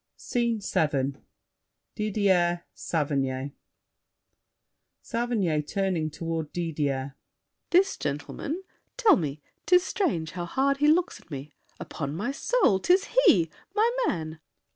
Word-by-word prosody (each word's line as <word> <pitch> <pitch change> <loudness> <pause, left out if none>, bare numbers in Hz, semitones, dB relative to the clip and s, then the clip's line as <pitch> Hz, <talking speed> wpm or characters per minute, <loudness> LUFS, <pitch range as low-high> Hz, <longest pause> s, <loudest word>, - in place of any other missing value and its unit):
SCENE 235 -2 -1
VII 140 -7 0 0.8
Didier, 190 -5 +1
Saverny 140 -3 -1 1.5
SAVERNY 225 -10 0
(turning 180 -1 -1
toward 160 0 -4
Didier). 145 -5 -2 0.6
This 380 +2 +3
gentleman? 150 - -4 0.3
Tell 450 -7 +6
me— 150 - -3 0.2
'Tis 360 0 +6
strange 220 - -1
how 175 -1 -4
hard 275 +9 +1
he 295 +1 +3
looks 335 +3 +2
at - - -23
me! 145 0 -7 0.3
Upon 140 -1 -5
my 220 +10 -2
soul, 275 - +2
'tis 365 - +3 0.2
he! 165 - +5 0.2
My 445 +3 +4 0.2
man! 160 -1 -3
175 Hz, 110 wpm, -27 LUFS, -, 1.5 s, Tell